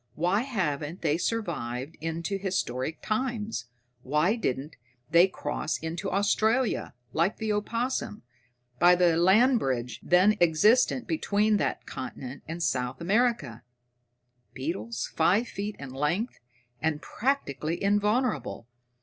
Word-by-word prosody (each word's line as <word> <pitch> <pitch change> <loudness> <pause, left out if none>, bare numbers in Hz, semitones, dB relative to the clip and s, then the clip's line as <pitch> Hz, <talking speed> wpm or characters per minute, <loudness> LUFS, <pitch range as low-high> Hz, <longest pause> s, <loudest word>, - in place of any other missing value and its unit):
Why 180 +6 +1
haven't 170 - -2
they 155 0 +1
survived 155 - -3
into 165 +4 -3
historic 160 -7 -2
times? 220 - -2 0.3
Why 150 - +2
didn't 150 - -3 0.4
they 170 +3 +7
cross 155 -3 -3
into 160 +1 -4
Australia, 220 - +1 0.2
like 170 +6 +1
the 220 -1 -1
opossum, 230 +1 -2 0.6
by 175 +1 +7
the 175 -2 +4
land 215 +9 +5
bridge 125 - -2
then 190 +4 +4
existent 210 +10 +4
between 215 -8 +1
that - - -2
continent 130 +1 -7
and 165 +1 -4
South 125 -2 -1
America? 190 - +1 0.9
Beetles 115 -2 -4
five 190 +9 +3
feet 205 0 -4
in 140 -2 -8
length, 150 - -1 0.4
and 155 -1 0
practically 170 - -2
invulnerable! 205 - 0
175 Hz, 115 wpm, -28 LUFS, 145-215 Hz, 0.9 s, they